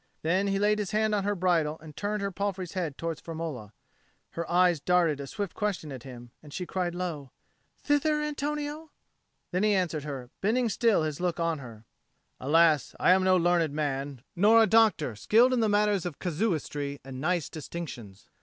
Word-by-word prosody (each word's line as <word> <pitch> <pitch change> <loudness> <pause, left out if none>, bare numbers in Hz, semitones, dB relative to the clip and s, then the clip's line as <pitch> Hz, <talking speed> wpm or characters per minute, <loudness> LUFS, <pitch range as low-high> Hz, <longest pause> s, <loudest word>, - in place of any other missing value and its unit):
Then 185 +5 +1
he 195 0 +1
laid 210 +1 +2
his 205 -3 -2
hand 215 0 +1
on 200 -2 0
her 205 0 0
bridle 170 -4 +1
and 155 -2 -12
turned 205 0 -2
her 200 - -1
palfrey's 190 -2 -3
head 170 -7 -3
towards 165 -2 -4
Firmola. 155 -10 -6 0.6
Her 170 0 -5
eyes 175 -2 +4
darted 170 -2 +2
a 140 - -6
swift 205 -2 -4
question 200 -8 -3
at 130 -3 -7
him, 120 -2 -11
and 150 - -14
she 180 +4 -4
cried 175 -1 -2
low, 165 -7 -4 0.5
"Thither, 300 +1 +2
Antonio?" 300 +1 -3 0.6
Then 180 - 0
he 210 -1 +3
answered 170 -5 -1
her, 135 -4 -6
bending 230 +4 +1
still 220 -4 +2
his 155 -2 -3
look 180 -1 -1
on 165 -2 0
her, 115 -4 -11 0.5
"Alas, 155 0 +3
I - - +5
am 185 +1 +4
no 185 0 +4
learned 170 -3 +2
man, 140 -3 -3
nor 220 +5 +6
a - - +5
doctor 215 - +3
skilled 235 - +4
in 250 - +2
matters 205 -2 +2
of 160 - -7
casuistry 150 -6 -2
and 130 -1 -7
nice 175 +1 0
distinctions. 140 - -8
175 Hz, 180 wpm, -28 LUFS, 150-205 Hz, 0.6 s, nor